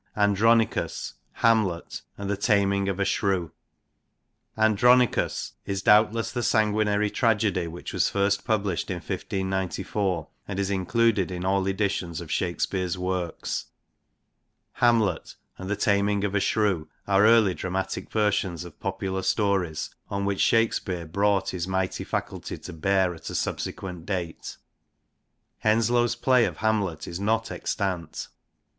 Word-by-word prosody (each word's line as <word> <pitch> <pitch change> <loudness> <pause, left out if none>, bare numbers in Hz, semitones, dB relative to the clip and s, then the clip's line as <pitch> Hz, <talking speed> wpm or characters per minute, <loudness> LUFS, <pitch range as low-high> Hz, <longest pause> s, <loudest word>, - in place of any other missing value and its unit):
Andronicous, 110 +3 +2 0.3
Hamlet^ 110 -7 +1 0.2
and 100 - -5
The 100 - 0
Tamynge 100 -1 +2
of 95 0 -3
A - - +3
Shro<wc. 95 -6 0 1.1
Andronicous 120 +3 +3 0.2
is 95 -1 -2
doubtless 110 +2 +4
the 120 - -2
sanguinary 105 -2 +2
tragedy 105 -7 +1
which 85 +2 -7
was - - +2
first 100 0 +1
published 105 -6 -1
in 90 - -1
1594, 95 -1 -2 0.2
and 100 - -4
is 100 0 0
included 100 +1 +2
in 90 0 -4
all 95 0 +1
editions 95 -4 -1
of 85 -3 -8
Shakespeare's 90 0 -1
works. 90 -2 -3 1.1
Hamlet 115 -8 +2 0.2
and 95 0 -6
The 105 - +1
Tamynge 100 -1 +2
of 100 -1 -1
A 100 - +2
Shrowe 95 -7 +1 0.2
are 100 0 +4
early 110 -4 +5
dramatic 95 +1 -3
versions 100 -5 0
of 85 - -13
popular 95 0 -3
stories, 95 -5 0 0.2
on 100 0 -2
which 100 -1 0
Shakespeare 95 -6 +1
brought 100 +3 +1
his 90 -1 -3
mighty 95 0 -1
faculty - - -4
to 90 - -9
bear 95 +2 +1
at 80 - -9
a - - -5
sub - - -1
sequent 90 -3 -6
date. 90 -4 -4 1.0
Henslowe's 120 +2 +2
play 125 -1 +3
of - - -4
Hamlet 105 -7 -1
is 85 - -5
not 110 +3 0
extant. 90 -6 -3
100 Hz, 135 wpm, -26 LUFS, 90-105 Hz, 1.1 s, early